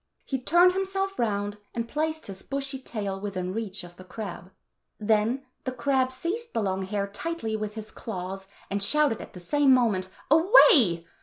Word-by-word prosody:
He 265 - -2
turned 345 +7 +5
himself 390 0 -2
round 205 -2 -1 0.2
and 230 -1 -2
placed 315 +4 -2
his 190 -1 -7
bushy 275 -1 -3
tail 200 -6 -4
within 185 -3 -3
reach 210 -3 -4
of 175 0 -13
the 185 - -11
crab. 185 -2 -7 0.5
Then 220 +5 +1 0.2
the 260 - -2
crab 255 +1 +1
15 260 - -9 0.2
seized 470 0 -16
the 225 - +1
long 190 -1 -1
hair 200 +1 -1
tightly 220 +2 -3
with 215 -1 -4
his 220 -1 -7
claws, 190 -2 -6 0.2
and 200 +1 -1
shouted 295 +2 +3
at - - -11
the 180 - -9
same 285 +9 +3
moment, 215 -8 +3 0.2
"Away!" 295 - +6
220 Hz, 175 wpm, -27 LUFS, 195-275 Hz, 0.5 s, Away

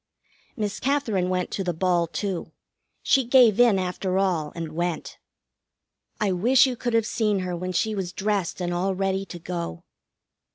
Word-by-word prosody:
Miss 210 -2 -2
Katherine 230 -10 0
went 180 -1 -1
to 195 - -2
the 175 -3 -2
ball, 175 -1 +1
too. 190 +1 -4 0.5
She 270 - +4
gave 240 -3 +5
in, 235 -5 +6
after 185 0 -2
all, 175 -6 0
and 165 -2 -5
went. 170 0 -3 1.0
I 210 -2 +1
wish 240 +8 +4
you 255 -2 -1
could 240 0 -2
have 225 -1 +3
seen 215 -4 0
her 180 -1 -3
when 185 +2 -4
she 220 +5 0
was 190 -4 -3
dressed 195 -2 -1
and 175 0 -1
all 190 +2 0
ready 195 0 -1
to 175 - -8
go. 170 - -5
190 Hz, 170 wpm, -25 LUFS, 175-215 Hz, 1.0 s, in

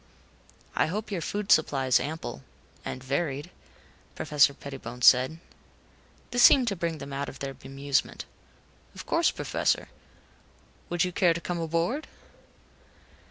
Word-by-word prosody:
"I - - +2
hope 210 +6 -4
your 185 -4 -2
food 205 +5 -3
supply 140 -4 +3
is 130 - +4
ample 150 - -5 0.4
and 130 - -6
varied," 140 +3 -2 0.6
Professor 150 -1 +3
Pettibone 125 -3 -9
said. 130 +6 +6 0.9
This 245 +1 +2
seemed 255 -1 +7
to 200 - -2
bring 170 -2 -2
them 140 -1 -8
out 140 +1 -3
of - - -10
their 135 -1 -5
bemusement. 140 +1 -2 0.7
"Of - - -9
course, - - +2
Professor. - - -1 1.0
Would 175 0 +1
you 180 - -1
care 175 -1 +3
to - - -3
come 175 0 -4
aboard?" 165 - -1
155 Hz, 135 wpm, -27 LUFS, 135-175 Hz, 1.0 s, seemed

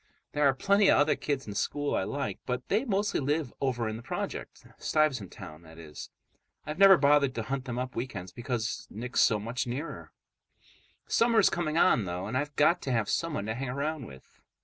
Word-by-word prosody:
There 145 -1 +3
are 135 - +3
plenty 200 +6 +3
of - - +6
other 145 +1 +3
kids 140 -3 -3
in 105 - -6
school 145 +7 -1
I 95 - 0
like, 140 +6 -3
but 125 0 -3
they 220 +6 +1
mostly 205 -3 0
live 145 -1 -1
over 125 -4 0
in 110 0 -3
the - - -9
project—Stuyvesant 130 - -2
Town, 75 +1 -10
that 80 -1 -15
is. 75 -3 -9 0.6
I've 155 +3 -5
never 195 -1 +9
bothered 140 -3 +3
to 115 - -2
hunt 135 +3 -3
them 120 -2 -4
up 125 0 -4
weekends 100 -7 -5
because 120 -1 -3
Nick's 125 +4 -1
so 110 - +4
much 115 +5 -3
nearer. 135 +7 -5 0.9
Summer 230 0 +2
is - - +5
coming 165 -2 -1
on, 120 - +4
though, 90 +1 -4
and 110 +5 -4
I've 145 +2 -2
got 170 +4 +3
to 135 - -3
have 115 -4 0
someone 155 -11 -1
to 110 - -2
hang 130 +2 -4
around 140 0 -3
with. 65 0 -16
130 Hz, 200 wpm, -29 LUFS, 115-150 Hz, 0.9 s, never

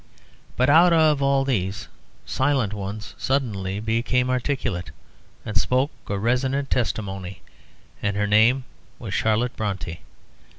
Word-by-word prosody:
But 130 - +3
out 165 +4 +6
of 155 -3 +4
all 135 0 +2
these 100 -7 -2 0.4
silent 130 -6 0
ones 105 +1 -6
one - - -22
suddenly 105 -8 -1
became 120 +3 0
articulate, 125 -8 -2 0.6
and 110 - -5
spoke 130 +8 +2 0.2
a 100 - -2
resonant 130 +6 0
testimony, 95 -6 -2 0.6
and 100 -1 -1
her 105 - +1
name 110 +6 +4 0.3
was 105 -5 -6
Charlotte 110 +4 +1
Brontë. 95 -6 -4
115 Hz, 125 wpm, -24 LUFS, 100-135 Hz, 0.6 s, out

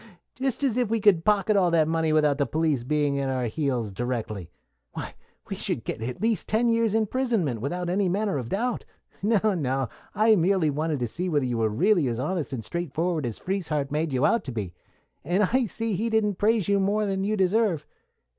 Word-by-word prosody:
Just 265 +1 -2
as 255 -4 +1
if 245 -4 +1
we 230 0 +1
could 200 -6 +4
pocket 210 +1 +2
all 185 -3 +4
that 165 -2 +3
money 160 -1 +1
without 150 -2 +3
the 140 - +1
police 155 -4 0
being 145 +1 0
at 135 -1 -1
our 130 -1 -1
heels 120 -4 -2
directly. 110 -6 -4 0.4
Why, - - -6 0.3
we - - -4
should - - -3
get 110 - -5
at 120 +2 -4
least 225 -1 +1
ten 230 +2 +2
years' 230 -2 +2
imprisonment 220 - 0
without 175 +7 -3
any 185 +1 +1
manner 200 -3 0
of 120 -2 -6
doubt. 235 +4 -1 0.4
No, 215 0 +2
no; 135 -6 -1 0.3
I 220 +1 +5
merely 180 -3 +2
wanted 155 0 -1
to 120 - 0
see 180 +10 -3
whether 145 -5 +1
you 120 -2 -1
were 110 -1 +2
really 170 - +2
as 115 -1 -2
honest 160 +3 -2
and 120 -5 -5
straightforward 170 -3 -2
as 115 - -5
Frieshardt 155 -7 -2
made 155 +1 -1
you 130 +1 +1
out 230 - +2
to 130 - -4
be, 100 -7 -4 0.5
and 180 +7 +1
I 250 +5 +2
see 225 0 -2
he 220 +5 -1
didn't 210 -3 +1
praise 215 -2 +2
you 200 0 +3
more 205 +2 +1
than 195 -1 -1
you 215 +2 0
deserve. 190 -3 +1
175 Hz, 210 wpm, -26 LUFS, 140-210 Hz, 0.5 s, I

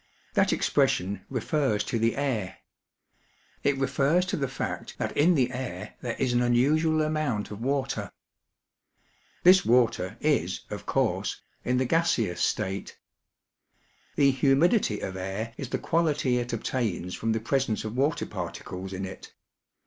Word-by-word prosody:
That - - +3
expression 95 +2 +1
refers 130 -3 0
to 115 - -2
the 115 +1 +2
air. 115 -9 -2 1.1
It 140 -1 +2
refers 140 +6 +2
to 190 +2 -2
the 140 -6 -1
fact 135 - -5
that - - -3
in 170 +4 +4
the 125 -3 +2
air 130 0 -5
there 120 -2 -3
is 130 -2 +1
an 120 - +3
unusual 155 +6 +3
amount 150 -10 -1
of 105 +1 -7
water. 135 +1 -1 1.3
This 185 +1 +7
water 115 -4 +2
is, 140 - +1
of - - -6
course, - - 0 0.2
in 125 0 +1
the 130 - +2
gaseous 120 - +1
state. 95 0 -1 1.2
The 140 -1 +5
humidity 135 - +3
of 95 - -4
air 95 +5 -4
is 135 - -6
the - - -1
quality 150 -6 +1
it 120 0 -3
obtains 110 -6 -2
from 115 - -1
the 110 - 0
presence 120 -1 0
of 110 +2 -4
water 140 +4 +1
par - - -4
ticles 95 +1 -7
in 95 +1 -3
it. 95 - -10
125 Hz, 150 wpm, -27 LUFS, 110-145 Hz, 1.3 s, This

